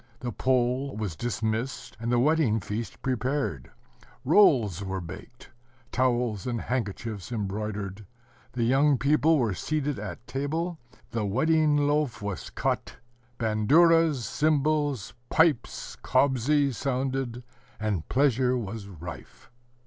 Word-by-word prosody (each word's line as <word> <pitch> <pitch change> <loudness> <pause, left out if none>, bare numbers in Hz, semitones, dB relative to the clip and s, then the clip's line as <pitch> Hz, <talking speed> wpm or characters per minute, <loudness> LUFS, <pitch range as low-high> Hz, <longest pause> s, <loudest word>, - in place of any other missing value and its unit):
The 125 -2 -3
Pole 130 +1 0
was 105 -7 -3
dismissed, 115 +4 -3
and 115 +1 -2
the 120 - +3
wedding 135 -4 +3
feast 105 +1 -5
prepared; 130 - -1 0.6
rolls 125 - +4
were 95 0 -3
baked, 95 +7 -10 0.4
towels 120 -5 0
and 120 -2 -1
handkerchiefs 110 -4 -4
embroidered; 105 -2 -4 0.5
the 120 - -1
young 135 +4 +4
people 150 +4 +3
were 115 -7 +1
seated 145 - -2
at 115 - -7
table; 160 +6 -3 0.3
the 115 -2 -1
wedding 150 +8 +2
loaf 145 -5 +1
was 100 -3 -5
cut; - - -2 0.4
banduras, 145 +6 +4
cymbals, 145 -7 +1 0.2
pipes, 160 -7 +1
kobzi, 140 +1 +2
sounded, 130 -1 -2 0.4
and 105 -6 -2
pleasure 130 -2 +2
was 110 -2 -5
rife 85 - -10
125 Hz, 110 wpm, -27 LUFS, 110-145 Hz, 0.6 s, rolls